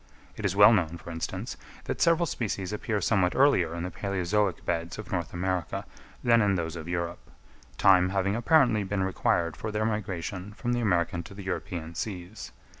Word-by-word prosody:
It 110 - -5
is 95 -1 0
well 100 +3 +8
known, 85 -5 +1
for 85 - -9
instance, 80 0 -4 0.3
that - - -4
several 170 +1 +4
species 100 - -3
appear 105 0 -2
somewhat 95 -5 +2
earlier 95 - +4
in 85 - -4
the 90 - -4
palæozoic 100 0 -1
beds 85 +1 -2
of 110 -3 -8
North 85 -3 -2
America 90 -1 -2 0.4
than 115 -1 +5
in 100 -2 +3
those 85 -2 -3
of 80 -1 -7
Europe; 85 0 -4 0.5
time 90 -2 +5
having 100 +1 0
apparently 120 -4 +4
been 95 0 -1
required 85 -3 0
for 110 +7 -5
their 105 +1 0
migration 100 -2 -3
from 120 +2 -2
the 120 - 0
American 90 -5 +1
to 100 - -12
the 100 - -8
European 90 -3 -4
seas. 95 +2 -6
95 Hz, 185 wpm, -28 LUFS, 85-105 Hz, 0.5 s, well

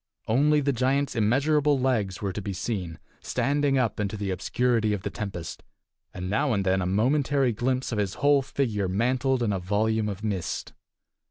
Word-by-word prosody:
Only 145 +6 +3
the 140 0 +1
giant's 130 +3 0
immeasurable 140 +6 +2
legs 110 -8 0
were 100 -2 -1
to 105 - -4
be 100 0 -4
seen, 90 -4 -4 0.2
standing 140 +2 0
up 115 -5 0
into 105 0 -2
the 100 -1 -2
obscurity 110 +3 +1
of 100 - -4
the - - -3
tempest, 95 -6 -6 0.5
and 90 0 -6
now 130 +7 +1
and 100 -2 0
then 95 0 +2
a 90 - -1
momentary 130 +6 +2
glimpse 130 +4 -1
of 110 - -1
his 100 -2 -1
whole 145 0 +4
figure 115 -7 -1
mantled 125 +6 +1
in 105 -3 +1
a 95 - -1
volume 105 +3 0
of 100 +1 -6
mist. 100 -5 -3
110 Hz, 180 wpm, -26 LUFS, 100-135 Hz, 0.5 s, whole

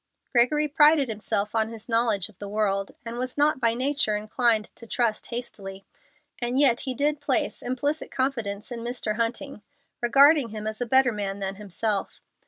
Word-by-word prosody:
Gregory 295 +5 +3
prided 295 -2 +4
himself 210 -1 -2
on 220 -1 +1
his 225 -2 -11
knowledge 225 -5 +1
of 215 -4 -21
the 205 - -7
world, 200 -2 -1
and 235 +1 -5
was 255 +2 -4
not 295 0 +3
by 230 -1 +3
nature 265 -4 +1
inclined 215 +1 0
to 230 - -12
trust 230 -2 0
hastily; 195 -5 -6 0.5
and 245 +2 -1
yet 260 -5 +4
he 260 -2 -3
did 290 +1 0
place 280 -3 0
implicit 285 +5 -2
confidence 235 -6 -2
in 240 - -5
Mr. 230 -2 -3
Hunting, 235 +2 -3 0.4
regarding 275 +2 +5
him 215 0 -7
as 215 +2 -5
a 245 - -1
better 260 +1 +4
man 200 -2 -3
than 195 -1 -3
himself. 205 0 -3
235 Hz, 175 wpm, -25 LUFS, 215-265 Hz, 0.5 s, regarding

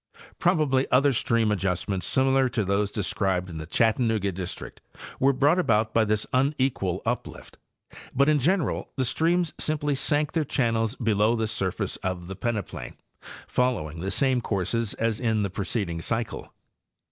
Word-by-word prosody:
— - - -21
Prob - - +3
ably 135 -2 +1
other 140 +2 +4
stream 115 -2 +1
adjustments 95 -1 -1
similar 130 0 +3
to 115 -4 -1
those 100 +1 +1
described 95 -2 -1
in 80 - -6
the 80 - -7
Chattanooga 110 0 +1
district 90 0 -7 0.4
were 135 +1 +4
brought 145 +6 +3
about 110 -8 +2
by 115 - +4
this 105 0 0
unequal 130 - 0
uplift; - - -4 0.6
but 140 +2 +4
in 155 -1 +4
general 170 +4 0
the 130 - 0
streams 170 +5 +1
simply 150 -1 -1
sank 145 +2 0
their 160 - +1
channels 115 -4 0
below 110 -2 +2
the 110 -1 0
surface 100 -4 -2
of 95 -2 -4
the 95 +2 -7
peneplain, 110 -2 -4 0.5
following 95 -12 -1
the 95 +3 -3
same 130 +2 +2
courses 105 +2 -1
as 115 -2 -1
in 110 -3 +1
the 100 - -2
preceding 95 -3 -3
cycle. 115 +6 -3
115 Hz, 160 wpm, -26 LUFS, 100-135 Hz, 0.6 s, other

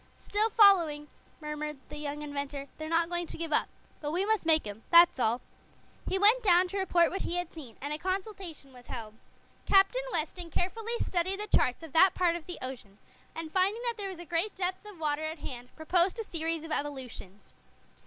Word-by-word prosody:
"Still 425 +2 0
following," 345 -9 +5 0.3
murmured 300 0 -4
the - - -8
young 295 0 -5
inventor. 280 -1 -5
"They're 310 0 -5
not 330 0 +2
going 345 0 -3
to - - -7
give 330 -2 -3
up. - - +3 0.3
But 295 - -4
we 355 +5 0
must 435 -5 0
make 315 -4 +5
'em 205 +1 -7
that's 340 -4 +7
all." 235 +1 +1 0.7
He 385 - 0
went 425 +6 +5
down 365 -3 +5
to 395 +2 -3
report 350 -3 +3
what 385 - -3
he 345 - -2
had 355 -1 -3
seen, 265 -9 -11
and 285 +2 -4
a 300 - -4
consultation 370 -7 -5
was 245 -1 -15
held. 220 -3 -7 0.5
Captain 390 +6 +4
Weston 335 +1 -3
carefully 450 +8 -2
studied 375 +2 0
the 420 0 +1
charts 250 +6 +1
of 320 -4 -10
that 370 +3 +6
part 350 -2 +2
of 340 -2 -7
the 355 - -5
ocean, 240 -6 -8 0.4
and 325 -1 -6
finding 395 +5 +1
that 475 -1 0
there 400 -2 -4
was 375 - -7
a 345 - -9
great 340 +6 0
depth 370 +1 -2
of 405 -5 -11
water 300 -1 -1
at 315 +1 -4
hand, 250 -4 -8
proposed 350 +5 +2
a - - -1
series 330 -4 -2
of 325 - -8
evolutions. 260 -10 -6
330 Hz, 205 wpm, -30 LUFS, 295-380 Hz, 0.7 s, that's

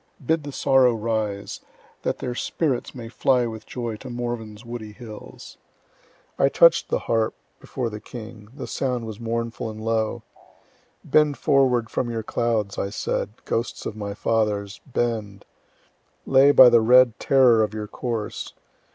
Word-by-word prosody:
Bid 160 +4 +2
the 145 - -5
sorrow 130 -3 +3
rise, 105 -3 -3 0.4
that - - -2
their 125 - -4
spirits 135 +1 -2
may 120 -3 -7
fly 125 +1 +2
with 110 -2 -7
joy 120 -3 -4
to 130 +4 -10
Morven's 120 -2 -5
woody 115 -3 -7
hills. 110 -2 -11 0.8
I 135 - +4
touch'd 170 +3 +5
the - - +1
harp 115 -1 0 0.2
before 120 -3 -4
the 105 - -6
king; 110 -1 -10
the 135 +2 -7
sound 125 -3 -2
was 110 -2 -7
mournful 115 0 -3
and 110 0 -8
low. 110 -1 -1 0.8
Bend 150 -2 +3
forward 125 -4 +2
from 120 - -1
your 115 -1 -3
clouds, 110 -3 -1
I 100 - -1
said, 100 - -2 0.2
ghosts 115 +1 -3
of 110 - -4
my 100 -2 -5
fathers! 105 -3 -1
bend. 110 -6 -2 0.8
Lay 135 +1 +6
by 130 -3 +9
the 120 -1 +5
red 125 +1 +5
terror 125 -4 +5
of 105 0 -1
your 105 -1 -4
course. 115 -1 -4
115 Hz, 150 wpm, -24 LUFS, 110-125 Hz, 0.8 s, by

